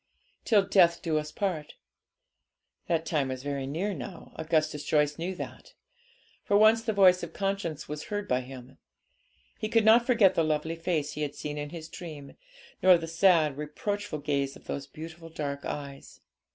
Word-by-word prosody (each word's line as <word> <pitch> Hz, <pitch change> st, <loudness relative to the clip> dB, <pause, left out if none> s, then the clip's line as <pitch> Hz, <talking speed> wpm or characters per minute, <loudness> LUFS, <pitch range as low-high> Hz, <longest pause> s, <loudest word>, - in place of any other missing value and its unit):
'Till 210 Hz, -3 st, +4 dB
death 180 Hz, -4 st, +3 dB
us 155 Hz, -2 st, 0 dB
do -, -, -16 dB
part.' 170 Hz, -7 st, -2 dB, 1.1 s
That 165 Hz, -1 st, 0 dB
time 150 Hz, -5 st, 0 dB
was 130 Hz, 0 st, -5 dB
very 140 Hz, -2 st, -3 dB
near 180 Hz, +9 st, -2 dB
now, 130 Hz, -8 st, -8 dB
Augustus 155 Hz, -2 st, 0 dB
Joyce 150 Hz, 0 st, +1 dB
knew 180 Hz, +3 st, -3 dB
that. -, -, -9 dB, 0.7 s
For 205 Hz, -, +3 dB
once 220 Hz, +2 st, +6 dB
the 225 Hz, -1 st, -1 dB
voice 185 Hz, -3 st, +5 dB
of -, -, -7 dB
conscience 195 Hz, -6 st, -3 dB
was 150 Hz, +1 st, -6 dB
heard 205 Hz, 0 st, -4 dB
by 125 Hz, -4 st, +1 dB
him. 130 Hz, 0 st, -11 dB, 0.8 s
He 215 Hz, -, -2 dB
could 225 Hz, -1 st, +3 dB
not 235 Hz, +2 st, +6 dB
forget 225 Hz, -7 st, +5 dB
the 165 Hz, -, +2 dB
lovely 155 Hz, +1 st, -1 dB
face 165 Hz, -3 st, -1 dB
he 150 Hz, -, -6 dB
had 145 Hz, -1 st, -3 dB
seen 150 Hz, 0 st, -5 dB
in 145 Hz, 0 st, -4 dB
his 160 Hz, 0 st, -8 dB
dream, 155 Hz, -5 st, -9 dB, 0.5 s
nor 185 Hz, -1 st, +7 dB
the 165 Hz, -, -5 dB
sad, 165 Hz, -4 st, +3 dB
reproachful 155 Hz, +2 st, -4 dB
gaze 140 Hz, -1 st, -1 dB
of -, -, -16 dB
those 140 Hz, -, -5 dB
beautiful 165 Hz, +1 st, -10 dB
dark 140 Hz, -3 st, -4 dB
eyes. 140 Hz, -1 st, -7 dB
160 Hz, 175 wpm, -28 LUFS, 145-190 Hz, 1.1 s, nor